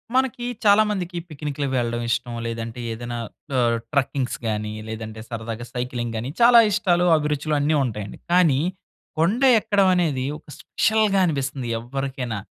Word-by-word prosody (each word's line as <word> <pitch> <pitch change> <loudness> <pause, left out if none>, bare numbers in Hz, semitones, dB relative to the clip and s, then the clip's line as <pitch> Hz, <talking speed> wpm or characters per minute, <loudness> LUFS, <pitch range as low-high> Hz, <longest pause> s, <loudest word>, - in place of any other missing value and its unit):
మనకి 255 -2 +1 0.2
చాలామందికి 205 -4 +3
పిక్నిక్‌లకి 145 -2 -4
వెళ్ళడం 120 -1 -1
ఇష్టం. 120 0 -1
లేదంటే 115 +1 -5
ఏదైనా 120 +1 -5 0.4
ఆహ్, 120 -2 +2
ట్రక్కింగ్స్ 135 -2 0
గాని 105 -1 -2
లేదంటే 110 0 -6
సరదాగా 115 0 -5
సైక్లింగ్ 125 -2 -3
గాని 120 +4 -4
చాలా 235 0 +8
ఇష్టాలు 180 -2 +2
అభిరుచులు 150 0 -1
అన్నీ 150 +2 +2
ఉంటాయండి. 105 -4 -5
కానీ 170 -7 +4 0.6
కొండ 195 +10 +2 0.2
ఎక్కడం 200 -2 +2
అనేది 150 -8 0
ఒక 155 - -21
స్పెషల్‌గా 215 -3 +2
అనిపిస్తుంది 135 -5 -2
ఎవ్వరికైనా. 125 -2 -4
135 Hz, 130 wpm, -23 LUFS, 120-175 Hz, 0.6 s, చాలా